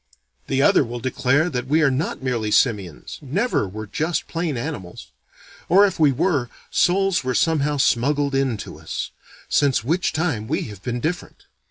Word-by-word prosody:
The 135 +1 +1
other - - +5
will 120 -1 -6
declare 130 +5 +1
that 125 -2 -3
we 155 +4 +3
are 140 - +4
not 135 0 -2
merely 120 -5 -1
simians, 100 - 0
never 155 - 0
were 110 +3 -7
just 155 - -2
plain 165 -5 -2
animals; 115 - -6 0.6
or, 195 +4 +7
if 195 - -2
we 150 -3 +5
were, 140 -3 0 0.2
souls 190 -1 +2
were 130 -1 -1
somehow 150 -3 +1
smuggled 140 +3 +2
in 135 -4 +1
to - - -10
us, - - -5 0.4
since 140 -6 +2
which 165 +8 0
time 155 -9 -1
we - - -1
have 100 -3 -11
been 120 +1 -3
different. 175 +5 -4
135 Hz, 170 wpm, -22 LUFS, 120-160 Hz, 0.6 s, or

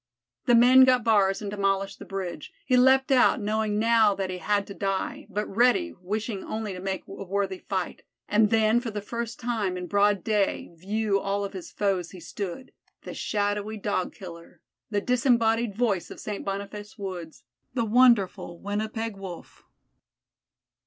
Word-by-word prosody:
The 240 - +6
men 250 +3 +8
got 255 -2 +4
bars 205 -3 +3
and 200 - -4
demolished 195 -1 -1
the - - -9
bridge. 190 -5 -5
He 255 - +2
leaped 265 +2 +5
out, 260 +1 +5
knowing 215 0 -1
now 220 -2 +4
that 190 -1 -3
he 180 - -5
had 200 +3 0
to 200 - -9
die, 195 -1 -3
but 210 +1 -2
ready, 250 - +2
wishing 210 +2 -3
only 215 -2 -4
to 180 - -7
make 190 0 -3
a - - -11
worthy 195 0 -2
fight, 190 -3 -4 0.3
and 210 0 +3
then 220 +1 +3
for 240 -1 -5
the 210 -1 -4
first 235 +2 -5
time 220 -6 -1
in 180 - -5
broad 205 0 +2
day 210 -5 0
view 200 +4 -1
of - - -8
all 200 0 0
his 185 -3 -8
foes 190 -4 -1
he 185 - -11
stood 200 +7 -6 0.3
the - - -7
shadowy 205 +1 -2
Dog 200 -3 -2
killer, 170 -3 -11 0.3
the 205 -2 0
disembodied 235 -3 +2
voice 215 -6 0
of - - -10
St. 210 -2 -5
Boniface 200 +3 -6
woods, 180 -5 -7 0.3
the 235 -3 +1
wonderful 220 -7 +3
Winnipeg 215 +3 -3
Wolf. 190 -3 -10
205 Hz, 165 wpm, -26 LUFS, 195-225 Hz, 0.3 s, men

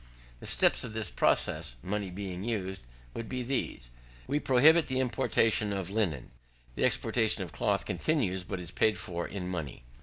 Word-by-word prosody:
The - - -9
steps - - +3
of 110 - -6
the 110 -5 -2
process, - - +1
money 100 0 -2
being 95 0 -5
used, 95 -5 -2 0.3
would 115 - -6
be 125 -1 -3
these: 120 - -3 0.3
We 145 +2 0
prohibit 150 +5 +5
the 130 -1 -1
importation 115 -4 +2
of 95 -2 -3
linen. 85 - -1 0.4
The - - +1
exportation - - +2
of - - -8
cloth - - 0
continues, 105 - 0
but 90 0 -5
is 90 -1 -6
paid 110 +1 +2
for 85 -1 -4
in 95 -3 -5
money. 80 -8 -5
100 Hz, 170 wpm, -30 LUFS, 90-125 Hz, 0.4 s, prohibit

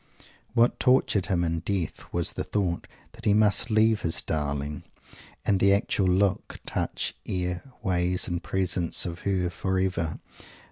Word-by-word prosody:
What 120 +1 +3
tortured 125 -7 +3
him 90 -4 +1
in 85 -1 0
death 95 -1 -3
was 85 -1 -1
the - - -3
thought 90 -5 -1 0.2
that - - -11
he 105 - +4
must 105 +2 +3
leave 110 0 +3
his 85 - 0
darling 75 -1 -2 0.6
and 100 -2 +3
the 100 +1 +5
actual 100 -2 0
look, 95 +1 +1
touch, - - -2
air, 90 -1 -1 0.2
ways 90 -2 +1
and 85 0 -2
presence 90 -2 0
of 85 -1 -5
her, 95 -3 0
forever. 95 -3 -1
90 Hz, 145 wpm, -27 LUFS, 85-100 Hz, 0.6 s, the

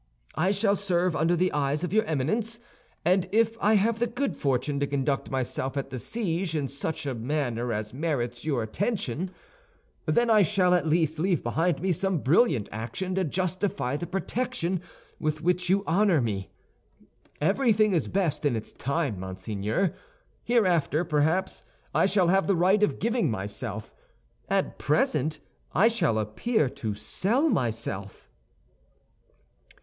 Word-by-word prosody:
I 175 +5 +1
shall 200 0 +2
serve 180 -3 0
under 165 +3 +2
the 185 +2 +1
eye 140 -1 0
of 165 +5 -2
your 220 0 +4
Eminence, 215 - -1 0.5
and 185 +1 +3
if 225 +1 +3
I 215 +2 +4
have 220 +3 +2
the 240 - +2
good 250 +4 -2
fortune 140 +1 0
to 140 - 0
conduct 140 0 -1
myself 130 +1 -2
at 135 0 -3
the 130 - -4
siege 180 - -2
in 145 -3 0
such 150 +3 -4
a 135 - -1
manner 120 -1 -2
as 105 +1 -3
merits 125 -5 -2
your 140 -7 0
attention, 180 - -2 0.8
then 240 0 +3
I 220 -2 +5
shall 185 -1 +3
at 175 -2 +2
least 160 -1 +1
leave 175 -1 +1
behind 160 +6 0
me 190 - +2
some 190 +2 0
brilliant 145 - +3
action 115 - -4
to 190 0 +1
justify 185 -4 -1
the 175 +4 -4
protection 190 -1 -2 0.4
with 155 0 -1
which 180 +1 +1
you 195 +1 +3
honor 185 -1 +3
me. 105 -6 -2 0.9
Everything 215 - +3
is 165 - +1
best 160 -6 -1
in 145 -5 +2
its 110 - -5
time, 140 - -2
monseigneur. 100 - -2 0.5
Hereafter, 175 -9 +2
perhaps, 160 +5 +1 0.3
I - - +4
shall 190 -3 +3
have 195 +2 +3
the 200 - +3
right 185 +4 +3
of 210 - +2
giving 230 - +1
myself; 105 +1 -4 0.6
at - - 0
present 155 +4 +1 0.4
I 215 +7 +6
shall 170 - +1
appear 130 - 0
to 110 -4 -4
sell 205 - +1
myself." 110 - -2
165 Hz, 150 wpm, -27 LUFS, 130-195 Hz, 0.9 s, I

